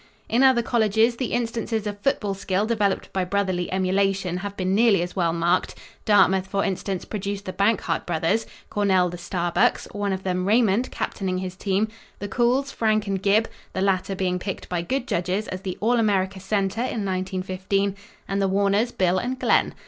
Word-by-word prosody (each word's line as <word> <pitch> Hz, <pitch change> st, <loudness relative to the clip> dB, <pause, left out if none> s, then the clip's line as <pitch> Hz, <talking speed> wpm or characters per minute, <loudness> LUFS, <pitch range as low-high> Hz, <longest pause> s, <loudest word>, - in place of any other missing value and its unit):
In 235 Hz, +3 st, +2 dB
other 260 Hz, -3 st, +5 dB
colleges, 225 Hz, 0 st, +2 dB
the 255 Hz, -, -2 dB
instances 230 Hz, -2 st, -1 dB
of 205 Hz, -1 st, -4 dB
football 205 Hz, -4 st, 0 dB
skill 195 Hz, +1 st, -1 dB
developed 210 Hz, -4 st, 0 dB
by 190 Hz, -, 0 dB
brotherly 185 Hz, -2 st, -1 dB
emulation 190 Hz, -1 st, +1 dB
have 200 Hz, +2 st, -6 dB
been 185 Hz, 0 st, 0 dB
nearly 205 Hz, -4 st, +4 dB
as 175 Hz, -, -6 dB
well 170 Hz, -3 st, +1 dB
marked. 170 Hz, +2 st, +1 dB, 0.3 s
Dartmouth, 190 Hz, -3 st, +4 dB
for 195 Hz, +1 st, 0 dB
instance, 190 Hz, -1 st, -3 dB
produced 200 Hz, -1 st, -4 dB
the 185 Hz, -, -5 dB
Bankhart 205 Hz, +2 st, 0 dB
brothers 175 Hz, +6 st, 0 dB, 0.2 s
Cornell, 190 Hz, -3 st, +2 dB
the 175 Hz, -, -7 dB
Starbucks 175 Hz, -1 st, 0 dB
one 205 Hz, -1 st, -1 dB
of 190 Hz, 0 st, -3 dB
them, 185 Hz, 0 st, -1 dB
Raymond, 225 Hz, +1 st, +3 dB
captaining 185 Hz, -3 st, -3 dB
his 185 Hz, 0 st, -4 dB
team 195 Hz, +2 st, 0 dB, 0.3 s
the 205 Hz, -, -5 dB
Cools, 250 Hz, +6 st, +1 dB
Frank 215 Hz, -1 st, +1 dB
and 195 Hz, -2 st, -2 dB
Gib 205 Hz, +3 st, +3 dB, 0.3 s
the 190 Hz, -, -2 dB
latter 195 Hz, 0 st, +1 dB
being 180 Hz, -1 st, -1 dB
picked 190 Hz, +1 st, -5 dB
by 175 Hz, -1 st, -1 dB
good 255 Hz, +8 st, -2 dB
judges 185 Hz, +5 st, -1 dB
as 185 Hz, 0 st, -5 dB
the 185 Hz, -2 st, -5 dB
All 235 Hz, +3 st, +3 dB
America 195 Hz, -3 st, +1 dB
center 195 Hz, +2 st, -1 dB
in 230 Hz, -4 st, -2 dB
1915 190 Hz, +1 st, -1 dB, 0.3 s
and 195 Hz, 0 st, -1 dB
the 195 Hz, -, +2 dB
Warners, 200 Hz, +4 st, +2 dB
Bill 185 Hz, 0 st, +1 dB
and 255 Hz, +4 st, -3 dB
Glenn. -, -, +2 dB
195 Hz, 180 wpm, -24 LUFS, 185-215 Hz, 0.3 s, other